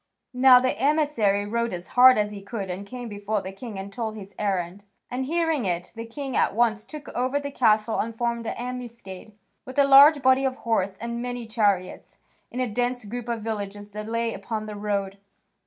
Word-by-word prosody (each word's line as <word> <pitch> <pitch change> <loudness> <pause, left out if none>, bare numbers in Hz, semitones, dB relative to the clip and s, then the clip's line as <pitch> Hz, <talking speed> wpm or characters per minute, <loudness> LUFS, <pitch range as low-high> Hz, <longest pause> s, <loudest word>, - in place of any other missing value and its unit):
Now 250 0 +7
the 255 -3 0
emissary 270 -8 +2
rode 235 +1 -1
as 175 0 -7
hard 255 +1 +7
as 210 0 0
he 205 -1 -8
could 200 -2 -5
and 195 +3 -6
came 245 +2 -7
before 205 -1 -3
the 190 - -6
king 210 +1 -8
and 195 +1 -7
told 220 -2 -4
his 200 -2 -10
errand, 190 -2 -2 0.3
and, 260 +1 -2
hearing 325 -3 0
it, 175 -1 -3
the 230 0 -7
king 270 +2 -5
at - - +2
once 225 -2 +2
took 300 -2 -9
over 255 +3 -1
the 285 0 -5
castle 220 -3 +2
and 230 +1 -2
formed 235 -1 -2
an - - -3
ambuscade, 235 -5 -7 0.3
with 260 +1 -10
a 285 - +6
large 280 +1 +7
body 260 +1 +4
of 265 -1 0
horse 195 -4 0
and 235 +2 -4
many 245 -1 -4
chariots, 205 -5 -1 0.3
in 245 - -6
a 255 - +1
dense 245 +1 -2
group 240 +3 -6
of 230 -2 -3
villages 205 -2 -5
that 210 +1 -6
lay 230 0 -1
upon 220 -2 -5
the 210 -1 -7
road. 200 -1 -3
230 Hz, 205 wpm, -25 LUFS, 205-250 Hz, 0.3 s, Now